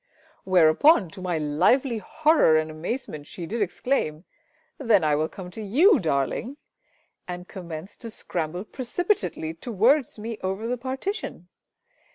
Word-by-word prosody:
Whereupon 185 Hz, -, +5 dB
to 190 Hz, -, -10 dB
my 180 Hz, -2 st, -1 dB
lively 225 Hz, -, +2 dB
horror 300 Hz, -, +3 dB
and 155 Hz, 0 st, -1 dB
amazement, 155 Hz, -, -5 dB
she 175 Hz, -, -7 dB
did 220 Hz, +6 st, -3 dB
exclaim, 180 Hz, -, -1 dB, 0.6 s
"Then 225 Hz, -, +3 dB
I 155 Hz, -1 st, +2 dB
will 155 Hz, +2 st, 0 dB
come 180 Hz, -2 st, -9 dB
to 220 Hz, -, -8 dB
you, 295 Hz, -, +5 dB
darling!" 165 Hz, -, -1 dB, 0.7 s
and 180 Hz, 0 st, -6 dB
commenced 175 Hz, 0 st, -8 dB
to 230 Hz, -, -6 dB
scramble 175 Hz, -4 st, -4 dB
precipitately 240 Hz, -, -2 dB
towards 235 Hz, -, +1 dB
me 220 Hz, +1 st, -6 dB
over 190 Hz, +4 st, -3 dB
the 245 Hz, +2 st, 0 dB
partition! 265 Hz, -, -5 dB
195 Hz, 135 wpm, -25 LUFS, 160-250 Hz, 0.7 s, Whereupon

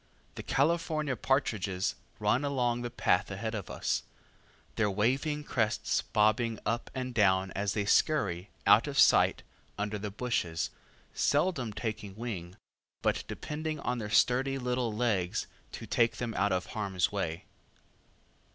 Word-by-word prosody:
The -, -, -6 dB
California 155 Hz, -1 st, +1 dB
partridges 105 Hz, -8 st, 0 dB, 0.2 s
run 130 Hz, -, +1 dB
along 125 Hz, -4 st, 0 dB
the 120 Hz, -, -3 dB
path 120 Hz, -, +1 dB
ahead 110 Hz, +3 st, -4 dB
of 105 Hz, -4 st, -5 dB
us, -, -, -1 dB, 0.7 s
their 105 Hz, -2 st, +2 dB
waving 135 Hz, +9 st, 0 dB
crests 110 Hz, -7 st, 0 dB
bobbing 110 Hz, +2 st, +2 dB
up 115 Hz, +2 st, -1 dB
and 130 Hz, -1 st, -3 dB
down 95 Hz, -3 st, +3 dB
as 100 Hz, +1 st, -1 dB
they 105 Hz, -2 st, -1 dB
scurry 100 Hz, -, +2 dB, 0.2 s
out 105 Hz, +7 st, +6 dB
of 140 Hz, -1 st, -4 dB
sight -, -, +5 dB, 0.3 s
under 105 Hz, 0 st, -2 dB
the 105 Hz, +1 st, -4 dB
bushes, 100 Hz, -7 st, -2 dB, 0.4 s
seldom 145 Hz, -6 st, +1 dB
taking 105 Hz, -2 st, -5 dB
wing, 95 Hz, -6 st, -6 dB, 0.5 s
but -, -, +1 dB
depending 155 Hz, 0 st, -4 dB
on 125 Hz, 0 st, -1 dB
their 105 Hz, -2 st, -4 dB
sturdy 130 Hz, +5 st, +3 dB
little 125 Hz, -2 st, -1 dB
legs 105 Hz, -6 st, 0 dB, 0.3 s
to -, -, -7 dB
take 115 Hz, -2 st, +2 dB
them 120 Hz, -2 st, -3 dB
out 100 Hz, -1 st, +1 dB
of 90 Hz, 0 st, 0 dB
harm's 95 Hz, -5 st, 0 dB
way. 85 Hz, -5 st, -3 dB
110 Hz, 140 wpm, -30 LUFS, 100-130 Hz, 0.7 s, out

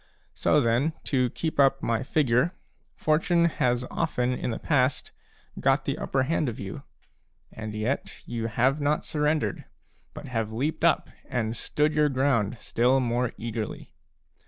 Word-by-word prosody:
So 150 Hz, -, +3 dB
then, 130 Hz, +5 st, +2 dB
to 125 Hz, -3 st, +1 dB
keep 160 Hz, +4 st, -3 dB
up 135 Hz, -1 st, +4 dB
my 115 Hz, -1 st, +1 dB
figure, 130 Hz, +4 st, +2 dB, 0.4 s
Fortune 170 Hz, +2 st, +2 dB
has 125 Hz, -6 st, +1 dB
often 125 Hz, -6 st, 0 dB
in 125 Hz, -, -3 dB
the 115 Hz, -, -2 dB
past 130 Hz, -3 st, +1 dB, 0.5 s
got -, -, +2 dB
the -, -, -2 dB
upper 135 Hz, -1 st, 0 dB
hand 155 Hz, 0 st, 0 dB
of 115 Hz, -, -7 dB
you, 95 Hz, -1 st, -6 dB, 0.7 s
and 110 Hz, -1 st, -6 dB
yet 115 Hz, +6 st, -3 dB
you 115 Hz, -1 st, -3 dB
have 130 Hz, +6 st, +1 dB
not 145 Hz, +1 st, +1 dB
surrendered, 150 Hz, -8 st, 0 dB, 0.5 s
but -, -, -8 dB
have 115 Hz, -3 st, -2 dB
leaped 135 Hz, +8 st, -2 dB
up -, -, +3 dB, 0.2 s
and 115 Hz, -2 st, -1 dB
stood 150 Hz, +6 st, 0 dB
your 150 Hz, 0 st, +3 dB
ground 130 Hz, -5 st, +1 dB
still 125 Hz, +3 st, +2 dB
more 120 Hz, -1 st, 0 dB
eagerly. 115 Hz, -1 st, -5 dB
125 Hz, 150 wpm, -27 LUFS, 115-150 Hz, 0.7 s, up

